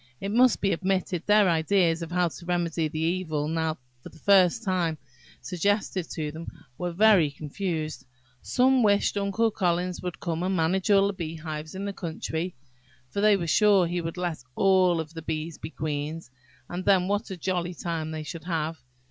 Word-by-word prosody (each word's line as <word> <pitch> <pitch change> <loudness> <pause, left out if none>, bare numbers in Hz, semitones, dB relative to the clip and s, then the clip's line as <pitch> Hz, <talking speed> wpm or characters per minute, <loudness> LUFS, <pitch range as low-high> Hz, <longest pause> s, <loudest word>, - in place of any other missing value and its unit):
It 195 - -3
must 250 +2 +4
be 195 - +2
admitted, 185 -1 -1
their 210 -1 +5
ideas 170 0 +2
of 165 0 -6
how 175 -1 +2
to 170 - -11
remedy 170 -2 0
the 155 +1 -7
evil 160 -3 -1
now 160 0 -1 0.2
for - - -10
the - - -17
first 195 +4 +4
time 180 -5 0 0.4
suggested 185 - -1
to 150 -2 -3
them, 160 +2 -8 0.3
were 175 +4 -3
very 190 -4 +5
confused. 155 +1 -4 0.3
Some 260 +1 +3
wished 205 -2 +3
Uncle 205 +3 +1
Collins 180 -2 -1
would 180 -1 -5
come 165 -1 -2
and 190 +1 0
manage 180 +4 +1
all 200 -1 +6
the 200 - 0
beehives 160 -2 -6
in 195 +1 -4
the 200 - -3
country, 170 0 -4 0.6
for 200 - -2
they 210 -1 +5
were 175 - -3
sure 195 +3 +4
he 175 +1 -2
would 165 +1 -5
let 175 -3 -2 0.2
all 185 -2 +4
the 160 +2 -9
bees 160 0 -4
be - - -6
queens, 155 -1 -4 0.4
and 180 +1 -5
then 185 -2 +3
what 205 +3 -1
a 190 - -5
jolly 175 0 -2
time 165 -2 -3
they 155 -1 -5
should 160 +1 -8
have! 160 -3 -2
175 Hz, 180 wpm, -26 LUFS, 160-195 Hz, 0.6 s, all